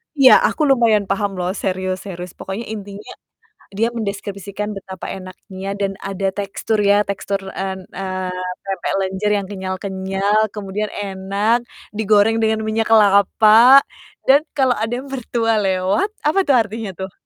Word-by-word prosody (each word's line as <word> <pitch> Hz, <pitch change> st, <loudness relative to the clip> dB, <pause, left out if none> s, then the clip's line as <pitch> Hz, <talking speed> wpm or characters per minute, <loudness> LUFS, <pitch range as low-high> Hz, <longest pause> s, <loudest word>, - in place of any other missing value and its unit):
Iya, 270 Hz, -2 st, +7 dB
aku 310 Hz, -, -4 dB
lumayan 230 Hz, -5 st, +4 dB
paham 200 Hz, 0 st, -1 dB
loh 180 Hz, 0 st, -2 dB
serius 185 Hz, 0 st, -3 dB
serius, 180 Hz, -2 st, -7 dB
pokoknya 195 Hz, +5 st, -6 dB
intinya 205 Hz, -1 st, -8 dB, 0.6 s
dia 215 Hz, +4 st, 0 dB
mendeskripsikan 200 Hz, -1 st, -5 dB
betapa 190 Hz, -1 st, -8 dB
enaknya 190 Hz, +1 st, -8 dB
dan 195 Hz, -1 st, -1 dB
ada 195 Hz, 0 st, -3 dB
tekstur 205 Hz, +2 st, -2 dB
ya, 205 Hz, +1 st, +4 dB
tekstur, 200 Hz, 0 st, -2 dB, 0.2 s
en 190 Hz, -1 st, -4 dB
eee, 185 Hz, -1 st, -4 dB, 0.3 s
pempek 195 Hz, -1 st, -3 dB
lenjer 190 Hz, +2 st, -1 dB
yang 200 Hz, -1 st, -3 dB
kenyal-kenyal, 190 Hz, +1 st, -1 dB
kemudian 210 Hz, +1 st, -4 dB
enak, 200 Hz, +3 st, -1 dB, 0.4 s
digoreng 215 Hz, +1 st, +3 dB
dengan 220 Hz, 0 st, +1 dB
minyak 220 Hz, 0 st, 0 dB
kelapa, 215 Hz, +4 st, +6 dB, 0.5 s
dan 280 Hz, +3 st, +6 dB, 0.2 s
kalau 260 Hz, -2 st, +3 dB
ada 225 Hz, +2 st, -2 dB
yang -, -, -12 dB
mertua 230 Hz, -3 st, -1 dB
lewat 190 Hz, -, +1 dB, 0.2 s
apa 315 Hz, +6 st, +2 dB
tuh, 280 Hz, -, +4 dB
artinya 220 Hz, -2 st, -1 dB
tuh? 190 Hz, 0 st, -6 dB
200 Hz, 140 wpm, -19 LUFS, 190-220 Hz, 0.6 s, Iya